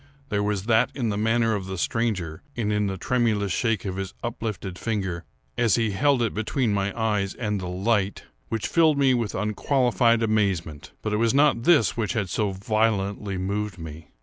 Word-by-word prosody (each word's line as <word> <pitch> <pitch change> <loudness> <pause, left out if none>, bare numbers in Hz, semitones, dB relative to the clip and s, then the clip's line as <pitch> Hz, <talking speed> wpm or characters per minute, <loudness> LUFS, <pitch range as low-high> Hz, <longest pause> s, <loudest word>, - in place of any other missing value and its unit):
There 100 -1 0
was 105 -2 -1
that 115 +2 +3
in 120 -5 -1
the 105 - -1
manner 115 +2 +2
of 100 -3 -3
the 95 0 -4
stranger, 95 -7 -1 0.2
and 105 -3 0
in 105 -1 +1
the 95 0 -3
tremulous 110 -3 0
shake 115 +1 0
of 95 -1 -3
his 95 -1 -5
uplifted 105 -6 -4
finger, 95 -7 -2 0.3
as 120 -4 +4
he 115 -3 +1
held 130 +4 +2
it 115 - -1
between 110 +1 0
my 100 0 0
eyes 105 -3 0
and 105 -4 -2
the 90 - -4
light, 100 +2 0 0.3
which 115 -1 -2
filled 160 -3 +3
me 135 -2 +4
with 115 -4 -1
unqualified 115 +2 +2
amazement; 95 -9 -1
but 105 - -1
it - - +2
was 115 +3 +2
not 140 -5 +3
this 155 - +4
which 115 -2 -1
had 100 -6 -2
so 105 -2 0
violently 100 -1 -1
moved 100 +2 -2
me. 80 -2 -9
105 Hz, 190 wpm, -25 LUFS, 95-115 Hz, 0.3 s, as